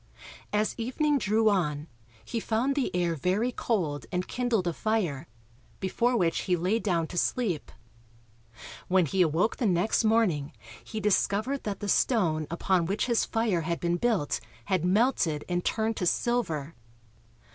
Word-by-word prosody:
As 210 +1 +1
evening 285 +5 +1
drew 220 0 +2
on, 150 -8 +1 0.4
he 230 - -3
found 230 +5 0
the 275 -2 0
air 175 -1 +1
very 185 - 0
cold 155 - -2
and 180 +1 -2
kindled 245 -6 0
a 170 - 0
fire, 170 -9 -1 0.5
before 235 +6 +1
which 170 -5 +1
he 180 - +4
lay 185 +6 0
down 175 -7 0
to 175 +2 -2
sleep. 190 - -1 1.2
When 185 -1 +3
he 185 +6 0
awoke 170 +5 +2
the 240 - +1
next 185 +5 +2
morning 210 -10 +2 0.3
he 220 - -5
discovered 210 +5 0
that 200 -2 -4
the 205 - -3
stone 170 - +2
upon 170 0 +1
which 200 +3 0
his 235 -2 +1
fire 225 -6 0
had 170 +1 -2
been 175 0 0
built 215 -9 0 0.3
had 185 -4 0
melted 185 - +2
and 175 0 -1
turned 220 0 0
to 180 - 0
silver. 165 - 0
190 Hz, 155 wpm, -28 LUFS, 170-225 Hz, 1.2 s, he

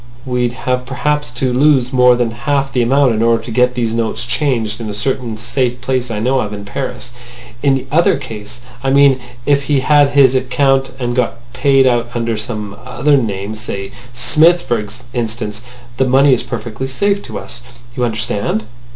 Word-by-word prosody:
We'd 125 -2 -1
have 125 0 -2
perhaps 145 +1 -1
to 125 0 -1
lose 135 -1 +3
more 125 -1 +5
than 120 -2 0
half 135 +4 -1
the 125 - +2
amount 130 +1 +3
in 110 - -1
order 115 0 +2
to 120 - -7
get 125 +2 +2
these 115 -2 -1
notes 115 -1 -2
changed 120 -4 -1
in 110 - -4
a 105 - -5
certain 120 0 -2
safe 125 +2 -1
place 125 0 -1
I 115 - -3
know 130 +4 +1
of 105 -3 -3
in 100 0 -7
Paris. 125 +2 -5 0.5
In 140 -2 +3
the 135 - -4
other 165 0 +3
case 120 -2 -9 0.2
I 135 - +1
mean 140 -1 +5 0.3
if 140 -1 +2
he 140 -2 +1
had 145 +1 +4
his 140 -2 +5
account 135 +1 +1
and 120 -2 -2
got 125 -2 0 0.2
paid 135 +1 +3
out 120 -2 +2
under 115 -1 -1
some 105 -2 -5
other 140 +3 +1
name—say 105 -3 -3 0.2
Smith, 155 +8 +3
for 115 -3 -1 0.3
instance—the 120 +2 -4
money 135 +2 +5
is 125 - +1
perfectly 120 +4 -5
safe 200 +9 0
to - - -10
use. 120 - -7 0.3
You 125 - -1
understand? 110 -2 -1
125 Hz, 180 wpm, -16 LUFS, 115-135 Hz, 0.5 s, more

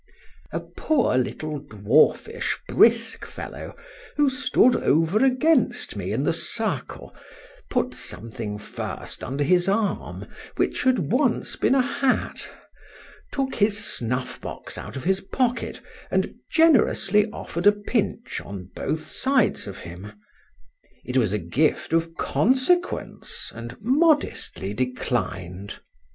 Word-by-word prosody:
A - - -1
poor 290 - 0
little 150 +4 -1
dwarfish 145 - +2
brisk - - +3
fellow, - - -8 0.4
who 290 -2 +3
stood 255 -2 +3
over 165 - +3
against 270 +5 +2
me - - -3
in - - 0
the - - +2
circle, - - -2 0.5
putting 250 -1 0
something 110 -2 -5
first 105 - -6
under 140 +3 -1
his 180 +4 +3
arm, 205 +1 -1 0.3
which - - 0
had 260 -1 +2
once 250 -1 +1
been 265 - +2
a 260 - +4
hat, 270 0 -1 0.8
took 270 -1 -1
his 205 -1 +2
snuff 125 - -3
box - - -7
out - - -7
of 135 - -5
his 190 +3 +1
pocket, 250 +4 -1 0.3
and - - 0 0.2
generously 230 - +4
offer'd 180 -3 -2
a - - +10
pinch 210 +2 -2
on 95 -2 -8
both 155 0 -2
sides 265 - +1
of 100 - -8
him: 90 +5 -9 0.9
it 125 - -5
was 115 -7 +3
a 105 - +1
gift 125 - 0
of 165 0 +1
consequence, 265 - 0
and 120 +1 -8
modestly 275 - +1
declined. 100 -6 -3
185 Hz, 120 wpm, -24 LUFS, -, 0.9 s, a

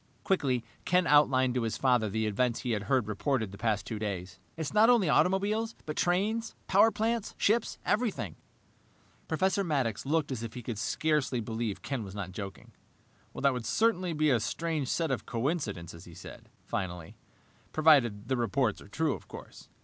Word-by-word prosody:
Quickly, 135 -10 +1 0.2
Ken 180 0 +3
outlined 130 -4 +4
to 125 - 0
his 115 -1 -2
father 125 -5 +2
the 110 +2 -1
events 115 +3 0
he 125 - -2
had 105 -3 -1
heard 130 -6 +2
reported 110 0 -1
the 100 - -10
past 110 -2 0
two 110 -3 -4
days. 95 -3 -4 0.2
"It's 160 +1 -4
not 215 +2 +6
only 230 -9 +4
automobiles, 200 +8 +2
but 150 - -4
trains, 210 +6 0
power 205 +4 +5
plants, 225 0 -1
ships, 220 +2 +1
everything 195 - 0 0.5
" - - -34
Professor 190 +4 +1
Maddox 135 - -1
looked 150 0 0
as 125 -4 -3
if 115 0 -6
he 125 - -6
could 110 -2 -4
scarcely 150 0 0
believe 110 -1 -3
Ken 130 -5 -3
was 95 -1 -9
not 95 -3 -5
joking. 95 0 -8 0.6
"That 140 -1 +2
would 125 -2 -4
certainly 185 -6 +1
be 155 -1 +2
a 125 - +3
strange 155 +4 -2
set 165 +1 0
of 125 -5 -3
coincidences," 110 - -3
he 85 - -13
said - - -11 0.2
finally, 90 -4 -4 0.6
"provided 135 -10 +4
the 130 - 0
reports 120 -1 0
are - - -13
true, 155 +9 0
of - - -9
course." - - -11
130 Hz, 180 wpm, -30 LUFS, 110-165 Hz, 0.6 s, not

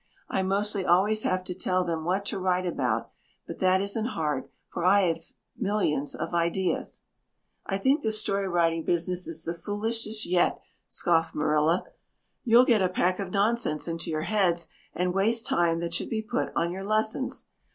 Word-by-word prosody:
I 190 - 0
mostly 200 +1 0
always 195 +5 +3
have 185 -2 0
to 185 - -5
tell 185 0 0
them 165 -2 -3
what 190 +3 0
to 195 - -3
write 185 0 0
about, 175 - -1 0.3
but - - -8
that 185 0 +3
isn't 205 +3 -1
hard 150 -4 -2 0.2
for 170 - -5
I've 180 -3 +2 0.2
millions 195 - -1
of - - -5
ideas." 170 +1 -1 0.6
"I 195 - -1
think 270 +9 +2
this 220 -3 +3
story 200 -2 0
writing 165 -2 +1
business 175 +2 0
is 165 -1 -3
the 170 - -3
foolishest 215 +4 -1
yet," 175 0 +2 0.3
scoffed 165 -2 +1
Marilla. 155 +3 +2 0.6
"You'll 240 +1 +6
get 230 -5 +3
a 185 - +2
pack 185 +1 0
of 195 -2 -3
nonsense 200 -5 0
into 165 0 -4
your 155 -1 -1
heads 175 -5 +1 0.3
and 180 0 0
waste 225 +4 +1
time 170 -1 +1
that 170 0 -3
should - - -1
be 220 -1 -2
put 240 +3 -2
on 170 +1 0
your 190 +2 -5
lessons. 215 +5 -1
185 Hz, 170 wpm, -27 LUFS, 170-210 Hz, 0.6 s, You'll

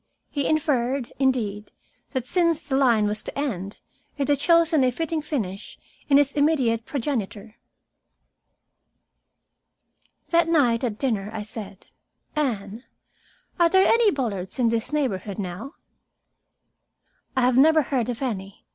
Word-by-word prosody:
He 285 -2 -1
inferred, 270 -4 0
indeed, 225 -6 0 0.4
that 260 -3 -2
since 335 +1 +1
the 285 -2 -2
line 240 -6 +3
was 210 +1 0
to - - -7
end, 200 -9 -3 0.4
it 280 0 -1
had 285 -2 +3
chosen 330 -1 +4
a 255 - +4
fitting 320 +4 -2
finish 220 - -4 0.3
in 280 - +6
his 285 -1 +3
immediate 265 -7 +1
progenitor. 230 -6 -4 2.7
That 335 -1 +3
night, 260 -7 +3
at 225 -4 -2
dinner, 215 -7 -1
I 220 -2 -5
said, 210 -2 -9 0.5
"Anne, 225 -6 -2 0.8
are 340 -1 +5
there 380 +2 +4
any 460 -2 +4
Bullards 220 - -3
in 240 -3 +2
this 230 +3 -2
neighborhood 210 -10 -2
now?" 200 - -6 1.6
"I - - +4
have 250 0 +3
never 315 +2 +5
heard 250 -4 -1
of 245 +2 -4
any. 195 -6 -5
255 Hz, 130 wpm, -24 LUFS, 215-295 Hz, 2.7 s, in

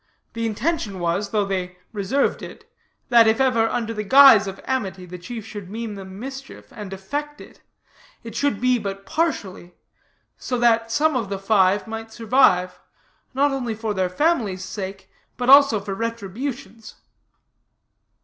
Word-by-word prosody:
The 230 0 -2
intention 225 - -2
was, 175 +4 -1
though 210 -1 0
they 180 -2 -4 0.2
reserved 210 +7 0
it, - - -11 0.4
that 235 -2 +6
if 220 +2 +2
ever, 235 -4 +2
under 230 -2 -2
the 210 - -3
guise 260 -2 +7
of 195 0 -7
amity, 195 -8 -3
the 180 0 -9
chief 225 +4 -8
should 205 -4 -9
mean 225 +1 -5
them 190 -1 -10
mischief, 270 +2 -9
and 210 -3 -8
effect 290 +10 -5
it, - - -15 0.6
it 230 -2 -9
should 280 -5 0
be 255 0 +2
but 195 -2 -6
partially; 205 - -3 0.6
so 250 - -3
that 230 -1 +2
some 305 +4 +2
of 230 -6 -2
the 200 - -3
five 195 -1 +2
might 225 0 -7
survive, 205 -7 +2 0.6
not 285 +2 +2
only 245 -5 -3
for 220 -1 -3
their 185 -2 -1
families' 205 - 0
sake, 190 -1 -7 0.3
but 250 +1 +2
also 275 -6 +7
for 200 0 -5
retribution's. 230 +2 -6
225 Hz, 155 wpm, -22 LUFS, 195-255 Hz, 0.6 s, guise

